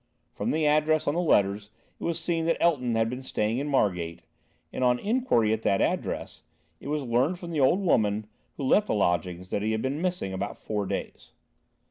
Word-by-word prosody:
From - - -3
the 155 0 +1
address 155 +1 +3
on 145 - +2
the 175 - 0
letters 100 - +2 0.3
it - - -9
was 170 -1 -1
seen 165 -1 -1
that 165 - +2
Elton 125 -9 +2
had 115 0 +2
been 125 +3 -5
staying 115 -2 -1
in 145 - -3
Margate, 90 - 0 0.5
and - - -2
on 125 -1 +4
inquiry 205 - +1
at 110 - -2
that 100 -3 +2
address, - - -2 0.4
it - - -10
was 150 0 -1
learnt 130 +8 +1
from 175 -1 -8
the 155 - -1
old 155 +8 +4
woman 110 - +2 0.3
who 140 - -4
let 205 +10 +3
the - - 0
lodgings, 90 -1 -1
that 100 - 0
he 110 +1 0
had 110 - -2
been 140 +4 -2
missing 180 - -2
about 95 +2 -4
four 105 -2 -3
days. - - -5
125 Hz, 205 wpm, -27 LUFS, 105-160 Hz, 0.5 s, on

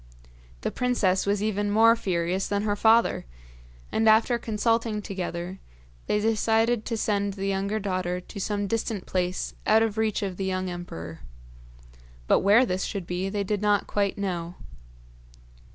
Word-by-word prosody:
The - - -2
princess 210 -7 +1
was 205 0 +1
even 205 -1 0
more 225 +2 +6
furious 185 -2 -1
than 205 +1 -1
her 205 -1 0
father, 225 - +3 0.6
and 220 0 +3
after 225 +2 +4
consulting 225 0 0
together 185 -2 -5 0.5
they 210 - +2
decided 225 +1 +1
to 230 - -2
send 205 -2 0
the 195 -1 -4
younger 195 +2 -1
daughter 185 -3 -2
to 200 +3 -10
some 205 +1 -1
distant 220 -2 -2
place 180 0 -2
out 220 +1 +5
of 220 -1 -1
reach 220 -1 0
of 190 -2 -4
the 195 - -2
young 185 -1 -2
emperor; 85 - -7 1.1
but - - +4
where 210 +6 +5
this 185 -3 -2
should 200 -4 -4
be 180 +2 -2
they 200 0 -1
did 205 +1 -2
not 205 -1 +2
quite 200 -1 -1
know. 175 -3 -3
205 Hz, 155 wpm, -26 LUFS, 185-220 Hz, 1.1 s, more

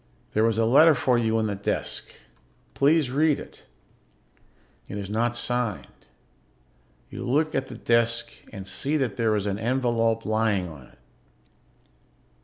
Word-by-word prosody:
There 110 +1 +3
is 115 -1 0
a 115 - +2
letter 150 +7 +6
for 125 -1 +2
you 110 -1 +1
on 110 - +1
the 105 - -1
desk. 100 0 -3 0.6
Please 145 -1 +2
read 150 +2 +2
it. - - -13 1.2
It 100 - -6
is 100 0 -6
not 120 +2 0
signed. 120 -4 -3 1.0
You - - -6
look 155 +5 +1
at 135 - -1
the - - -9
desk 115 0 +1 0.2
and 95 -3 -8
see 140 +10 -1
that 125 -8 -2
there 110 -2 +2
is 105 -1 -1
an 100 0 -2
envelope 115 -2 0
lying 110 -4 +1
on 75 -6 -12
it. - - -24
115 Hz, 150 wpm, -25 LUFS, 105-130 Hz, 1.2 s, letter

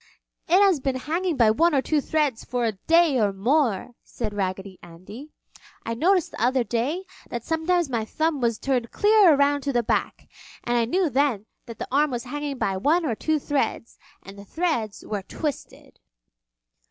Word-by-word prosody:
"It 360 +3 +5
has 380 -6 +3
been 265 0 -2
hanging 330 +5 -2
by 225 -3 +5
one 330 +8 +2
or 270 - +3
two 305 -2 +1
threads 290 -6 -1
for 245 -1 -2
a 225 - +1
day 320 - +2
or 205 -2 +2
more!" 235 +1 0
said 215 -3 -6
Raggedy 190 -1 -4
Andy. 185 - -12 0.6
"I 230 - -2
noticed 355 +8 +1
the - - -8
other 255 +1 +2
day 255 +11 -2 0.3
that 235 -1 -5
sometimes 325 +3 0
my 235 -4 -2
thumb 310 +5 -1
was 230 -2 +1
turned 250 -2 -1
clear 415 -6 +5
around 285 0 +2
to 280 - -2
the 240 -1 +1
back, - - -2 0.4
and 240 - -1
I 235 -1 +2
knew 360 +9 +1
then 265 -6 0 0.2
that 230 -2 -9
the - - -5
arm 295 +3 +3
was 240 -2 -4
hanging 285 +2 -5
by 195 -5 -1
one 315 - +2
or 250 - 0
two 315 +8 0
threads 280 -5 -3 0.2
and 195 +1 -12
the - - -10
threads 240 - -2
were 210 -2 -3
twisted." 290 - -6
265 Hz, 185 wpm, -24 LUFS, 225-315 Hz, 0.6 s, It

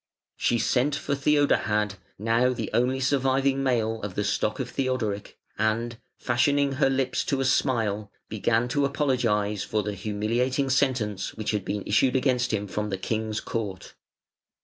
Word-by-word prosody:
She 120 - +1
sent 130 +5 +1
for 140 - -2
Theodahad, 140 -8 +2 0.2
now 115 +4 +2
the 115 -3 -4
only 125 +2 +2
surviving 135 0 +2
male 115 -4 0
of 100 -3 -5
the 105 - 0
stock 105 +2 0
of 130 - -2
Theodoric, 120 -6 -2 0.2
and, 115 +2 0 0.2
fashioning 140 +3 +2
her 135 0 +2
lips 135 -1 0
to 135 - 0
a 135 - 0
smile, 110 -6 +1 0.2
began 115 +2 +1
to 145 +3 +1
apologise 115 -8 0
for 105 -1 -1
the 105 +1 -3
humiliating 115 +7 -1
sentence 125 -8 0
which 110 - -2
had 105 -3 -3
issued 105 +6 +1
against 125 -2 +2
him 105 -2 -1
from 105 +2 -3
the 95 - -2
King's 110 +2 -2
Court. 100 -5 -5
120 Hz, 150 wpm, -26 LUFS, 105-130 Hz, 0.2 s, Theodahad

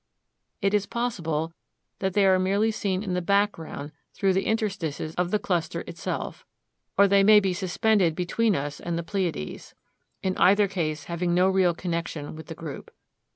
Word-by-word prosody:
It 200 +1 +2
is 205 -1 +2
possible 165 -10 -2 0.5
that 190 -1 -1
they 200 0 +4
are 190 -1 +5
merely 200 +4 +2
seen 195 -3 -1
in 190 -4 -3
the 180 - 0
background 175 -6 0 0.2
through 195 -2 +2
the 190 +1 0
interstices 190 -9 -2
of 180 0 0
the 210 - +2
cluster 175 -5 -1
itself, - - -5 0.5
or 200 - +7
they 200 0 +5
may 210 +1 +8
be 195 -2 0
suspended 190 -1 +2
between 200 +4 +1
us 145 -1 -3
and 170 -1 -3
the 170 - -2
Pleiades, 175 - -4 0.5
in 185 -1 0
either 200 +2 +5
case 155 -6 -2
having 175 0 -1
no 180 +1 +4
real 185 -3 +3
connection 170 -4 -4
with 160 -1 -10
the 165 - -7
group. 155 -3 -8
185 Hz, 170 wpm, -26 LUFS, 165-200 Hz, 0.5 s, may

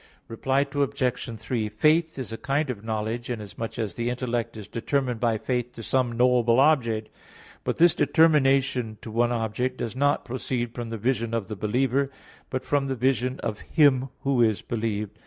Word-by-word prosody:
Reply 130 +4 0
Obj. 125 -5 -1
3: 110 -1 -2
Faith 155 +9 +2
is 130 -4 -5
a 115 - -4
kind 140 0 0
of 105 -4 -8
knowledge, 110 +2 -3
inasmuch 110 -1 -5
as 110 -3 -2
the 120 0 -2
intellect 120 -2 -2
is 105 - -8
determined 125 0 -1
by 115 -2 +1
faith 125 +1 -2
to 115 - -9
some 125 0 +1
knowable 120 0 +3
object. 115 -7 +3 0.5
But - - -2
this 170 0 +6
determination 135 -6 +3
to 110 - -7
one 120 +2 +2
object 120 +2 -1
does 115 0 -4
not 145 +2 +1
proceed 120 -1 -3
from 120 -1 -5
the 115 - -4
vision 115 0 -1
of 110 -4 -3
the 110 - -4
believer, 130 +6 +1 0.4
but 130 - -3
from 140 -1 +1
the 135 - -1
vision 130 +1 0
of 105 -1 -3
Him 135 -4 +3
who 135 -3 +2
is 110 -5 +2
believed. 110 -2 -3
120 Hz, 175 wpm, -26 LUFS, 115-135 Hz, 0.5 s, this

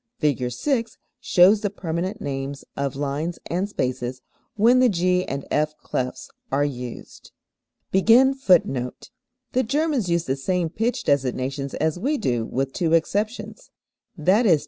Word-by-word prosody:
Fig. 140 -5 0
6 230 - -1 0.2
shows 195 +3 +5
the 205 - 0
permanent 185 +2 -3
names 140 0 -4
of 140 -1 -2
lines 145 +4 -2
and 185 +4 -1
spaces 125 -6 -2 0.4
when 235 +4 +5
the 255 -1 +5
G 180 -1 +1
and 140 +1 -4
F 150 0 +1
clefs 125 0 -4 0.2
are 140 +2 +2
used. 125 -4 -7 0.6
[Footnote 250 +8 +5
6: 135 - +1 0.4
The 255 - +2
Germans 275 - 0
use 170 -1 +1
the 135 - 0
same 175 +4 -1
pitch 225 +7 -1
designations 135 0 -1
as 160 +2 -1
we 285 +9 0
do 120 - -1
with 135 +1 -2
two 165 -2 0
exceptions, 210 - -1 0.5
viz. 185 +1 +4
170 Hz, 140 wpm, -23 LUFS, 135-215 Hz, 0.6 s, shows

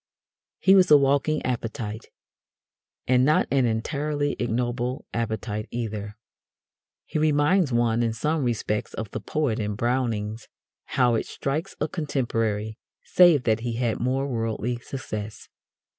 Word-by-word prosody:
He 190 - +5
was 185 -2 +6
a 150 - +9
walking 140 +2 +1
appetite. 115 -3 -4 1.0
And 125 0 +4
not 150 +3 +3
an 135 -3 +3
entirely 145 +5 -1
ignoble 120 +1 -2
appetite 110 -1 -3
either. 105 -3 -5 0.9
He - - -2
reminds 150 +2 +3
one 120 -1 +2
in 115 -1 +1
some 150 +7 -1
respects 110 -3 -2
of 110 -2 -5
the 110 - -5
poet 130 -2 -1
in 105 -1 -2
Browning's 115 -2 -1 0.4
"How 125 -3 +2
it 115 - -1
strikes 155 +7 -3
a 150 - 0
Contemporary," 115 - -2 0.2
save 175 -7 +5
that 110 -1 +2
he 120 0 -3
had 115 -1 -1
more 130 +3 0
worldly 115 -1 -2
success. 110 -4 -7
120 Hz, 130 wpm, -25 LUFS, 110-145 Hz, 1.0 s, a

